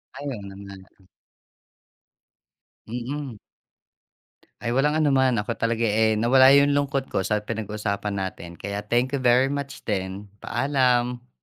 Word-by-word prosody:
Ay, 140 +2 -8
oo 115 -6 -6
naman. 100 0 -10 2.1
Mm. 125 +2 -5 1.3
Ay, 115 - -1
walang 150 +4 +2
anuman 135 -4 +3
ako 105 - -4
talaga, 115 0 0
eh 110 0 +2
nawala 130 +4 +6
yung 140 0 +4
lungkot 140 -1 0
ko - - +1
sa 105 +2 0
pinag-usapan 105 -2 -3
natin. 90 -2 -6
Kaya, 100 +1 -4
thank 120 +5 0
you 140 - -1
very 125 +2 +4
much 140 -1 -5
din. 100 -1 -3
Paalam. 125 -3 0
120 Hz, 125 wpm, -24 LUFS, 105-135 Hz, 2.1 s, nawala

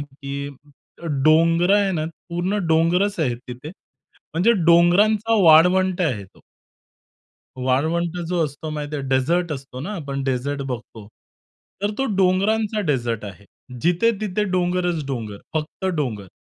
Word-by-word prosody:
की 140 0 -6 0.8
डोंगरं 165 +4 +4
आहे 200 -1 +2
ना, 155 -3 -1 0.2
पूर्ण 175 +4 -1
डोंगरंच 175 +5 +2
आहेत 125 -6 0
तिथे. 125 +4 -8 0.7
म्हणजे 185 +8 +4
डोंगरांचा 200 +6 +4
वाळवंट 180 +3 +5
आहे 125 - -1
तो. 95 - -22 1.3
वाळवंट 160 +6 0
जो 175 -1 0
असतो 145 +2 -7
माहिती 150 0 -4
आहे, 140 - -4
डेझर्ट 160 +6 +1
असतो 135 -2 -7
ना. 190 +10 -5
आपण 140 -4 -4
डेझर्ट 135 +2 -2
बघतो. 120 -5 -7 0.7
तर 205 +1 0
तो 270 - 0
डोंगरांचा 205 +3 +1
डेझर्ट 120 -6 -1
आहे. 100 0 -11 0.4
जिथे 175 +7 +3
तिथे 210 0 -1
डोंगरच 180 -4 -1
डोंगर, 110 -6 -5 0.2
फक्त 155 +4 -4
डोंगर. 110 -10 -3
160 Hz, 130 wpm, -22 LUFS, 135-180 Hz, 1.3 s, वाळवंट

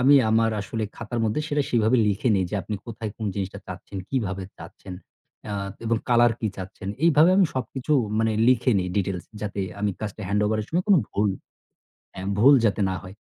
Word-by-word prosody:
আমি 135 +3 +6 0.2
আমার 115 0 +3
আসলে 110 +2 -3
খাতার 115 0 -4
মধ্যে 110 +8 0
সেটা 145 -2 +1
সেইভাবে 115 +1 +3
লিখে 105 +4 +1
নিই 95 - +2
যে - - -3
আপনি 105 - -4
কোথায় 115 -2 -5
কোন 110 - -4
জিনিসটা 100 0 -4
চাচ্ছেন, 95 +1 -8
কিভাবে 100 -8 -2 0.2
চাচ্ছেন 95 - -10 0.5
অ্যা 105 - -4 0.3
এবং 115 0 +1
color 120 0 +5
কি 110 - 0
চাচ্ছেন। 95 +1 -7 0.2
এইভাবে 165 +1 +6
আমি 195 -3 +5
সবকিছু 130 +3 -3 0.3
মানে 110 0 +2 0.2
লিখে 130 0 +3
নিই 90 - -1
details 95 -3 -1 0.2
যাতে 100 -1 -3 0.2
আমি 105 0 +1
কাজটা 110 0 -5
handover 105 +1 +1
এর 105 - -6
সময় 175 +3 0
কোনো 200 -4 +7
ভুল 105 +1 +1 0.8
হ্যাঁ, 95 +1 -6
ভুল 135 +6 +8
যাতে 105 0 +1
না 95 - -2
হয়। 95 +1 -10
110 Hz, 190 wpm, -24 LUFS, 100-125 Hz, 0.8 s, ভুল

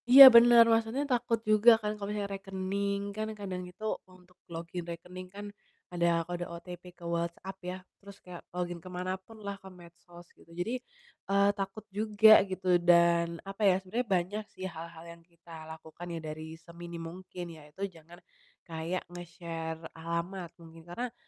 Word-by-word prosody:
Iya 270 +2 +13
bener, 235 0 +9
maksudnya 225 +5 +1
takut 240 -4 0
juga 215 +2 +7
kan 210 -1 -3
kalau 205 -1 -6
misalnya 205 -1 -3
rekening 195 +1 -2
kan 215 +1 -3
kadang 190 -3 -5
itu 195 +4 -9 0.2
untuk 180 0 -20 0.2
login 170 +1 -5
rekening 180 +2 -8
kan 200 +2 -9 0.5
ada 170 -1 +2
kode 175 0 -4
OTP 175 +1 -9
ke 170 - -12
WhatsApp 170 +3 -3
ya 180 0 -5 0.2
terus 200 0 -12
kayak 180 -1 -9
login 175 -1 -3
kemanapun 185 +4 -6
lah, 200 0 -5
ke 190 - -11
medsos 175 -1 -15
gitu - - -22
jadi, 180 +7 -2 0.6
eee, 200 0 +4
takut 195 +2 -4
juga 215 +1 +7
gitu. 185 -2 +1
Dan 170 -1 +4
apa 195 +2 -8
ya, 185 - +4
sebenernya 210 +6 -3
banyak 190 +5 -1
sih 185 - -8
hal-hal 165 -2 -8
yang 170 0 -11
kita 165 -2 -13
lakukan 160 +2 -10
ya 170 - -4
dari 155 0 -7
seminim 170 0 -9
mungkin, 180 +1 -8
yaitu 155 +4 -7
jangan 170 +1 -15 0.5
kayak 165 +2 -3
nge-share 165 -2 -6
alamat 170 +2 -4
mungkin, 165 -1 -14
karena 240 +7 -4
180 Hz, 160 wpm, -30 LUFS, 170-200 Hz, 0.6 s, Iya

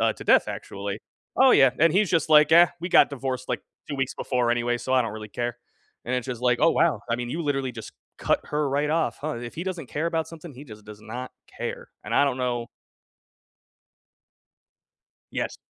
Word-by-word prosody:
uh, - - +3
to - - -11
death, - - +5
actually. 100 +1 -6 0.4
Oh, 265 0 +6
yeah, 135 - +6
and 165 0 +5
he's 200 +1 +3
just, 165 -4 +1
like, 150 0 +6
"Ah, 170 +1 +8
we 175 - -3
got - - +5
divorced, 130 -2 -4
like, - - -2 0.3
2 145 - -4
weeks 135 0 -2
before 125 -2 0
anyway, 120 0 0
so 130 - -4
I 130 -1 +4
don't 110 -2 -4
really 110 0 -8
care." 120 +2 -4 0.5
And 125 - -2
it's 125 0 -2
just, 125 -2 -5
like, 125 -1 +2
oh, 165 - +5
wow. 170 - +2
I 115 - +2
mean, 120 0 -4
you 165 +6 -3
literally 135 -3 -1
just 110 -2 -9 0.2
cut - - +1
her 150 -1 -1
right 145 +2 0
off, 165 0 0
huh. 150 -4 -3
If 120 +3 -8
he 170 - -4
doesn't 175 -8 -5
care 155 +3 -2
about 165 -1 -1
something, 165 -1 -10
he 135 - -11
just 105 -5 -13
does 105 0 -12
not 120 +4 -7 0.3
care, - - -5 0.2
and - - -3
I 140 - +5
don't 135 -3 0
know 120 -2 -2 2.6
Yes. - - -3
130 Hz, 215 wpm, -25 LUFS, 120-155 Hz, 2.6 s, Ah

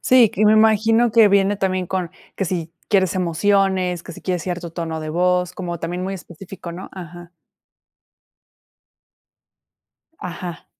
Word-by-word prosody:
Sí, 250 -4 +5
y 215 - +2
me 210 - +6
imagino 220 +2 +4
que 225 -1 +6
viene 200 0 +3
también 185 -2 -1
con 180 -2 -2 0.3
que 195 - -1
si 170 -2 -3 0.2
quieres 190 -3 +2
emociones, 185 0 +1
que - - -9
si - - -12
quieres 180 -3 -2
cierto 175 -2 -5
tono 165 -2 -4
de 155 0 -5
voz, 180 +1 +1
como 175 -2 -5
también 175 +3 -4
muy 190 +1 -3
específico, 180 0 -10
¿no? 185 +3 -8
Ajá. 175 -1 -10 2.9
Ajá. 175 -1 -7
180 Hz, 145 wpm, -21 LUFS, 175-195 Hz, 2.9 s, me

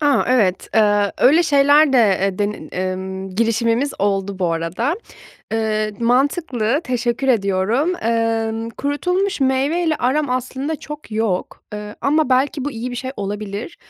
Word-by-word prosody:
Aaa, 290 -2 +3
evet, 210 -8 +2
eee, 205 -2 +3
öyle 315 +7 +5
şeyler 285 -1 +4
de, 260 - +5 0.2
eee, 195 -1 -1
denin 205 -6 -3 0.2
ımm, 190 +1 -6
girişimimiz 230 +5 +1
oldu 195 -1 -1
bu 175 -3 0
arada. 175 - -1 0.6
Iıı, 215 -1 0
mantıklı, 255 0 +1
teşekkür 245 +1 -1
ediyorum. 220 - +1
Emm, 225 0 0
kurutulmuş 360 - -1
meyveyle 290 +5 +1
aram 275 +2 0
aslında 260 +4 -2
çok 300 -2 -9
yok. 215 -4 -2
Iıı, 210 0 -6
ama 300 0 +2
belki 270 +2 +1
bu 290 - -2
iyi 245 0 -5
bir 245 - -5
şey 260 +1 -4
olabilir. 205 +6 -5
235 Hz, 140 wpm, -19 LUFS, 210-280 Hz, 0.6 s, öyle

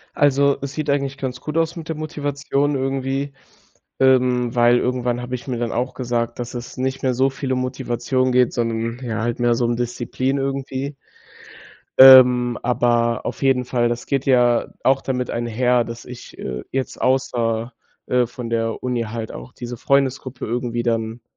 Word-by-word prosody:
Also, 140 -1 +3
es 140 0 -5
sieht 155 -1 -3
eigentlich 140 -1 0
ganz 130 -2 -4
gut 155 +5 -4
aus 165 0 +1
mit 165 -1 -7
der 160 - -3
Motivation 145 -1 -2
irgendwie, 135 +1 -2 0.7
ähm, 125 -2 +3
weil 120 0 +5
irgendwann 125 -1 -1
habe 125 +1 -5
ich 125 +3 -6
mir 125 - -2
dann 120 -1 -2
auch 125 +2 -2
gesagt, 120 -2 -2
dass 120 0 -5
es 120 -1 -7
nicht 130 +1 -2
mehr 130 -1 +1
so 130 +2 +2
viel 135 0 -4
um 130 - -1
Motivation 130 0 -1
geht, 125 -1 +3
sondern 115 0 -2
ja 115 -3 -3
halt 120 +1 -2
mehr 120 -1 +3
so 120 - 0
um 120 0 0
Disziplin 125 +2 -2
irgendwie. 135 +1 -3 1.0
Ähm, 125 -2 +8
aber 120 -1 +1
auf - - -5
jeden 135 -2 +2
Fall, 120 -1 +1
das 120 0 -3
geht 135 -1 -1
ja 125 -3 +3 0.2
auch 135 0 +3
damit 125 -2 -2
einher, 120 +1 +1
dass 115 0 -8
ich, 125 -1 -11
äh, 65 -1 -5
jetzt 135 -1 -3
außer, 120 -3 0 0.3
äh, 125 -1 +2
von 120 -1 -7
der 115 -1 -1
Uni 125 -2 -1
halt 110 0 -5
auch 125 - -9
diese 120 0 -7
Freundesgruppe 135 -1 0
irgendwie 120 0 -2
dann 115 0 -2
125 Hz, 175 wpm, -21 LUFS, 120-135 Hz, 1.0 s, Ähm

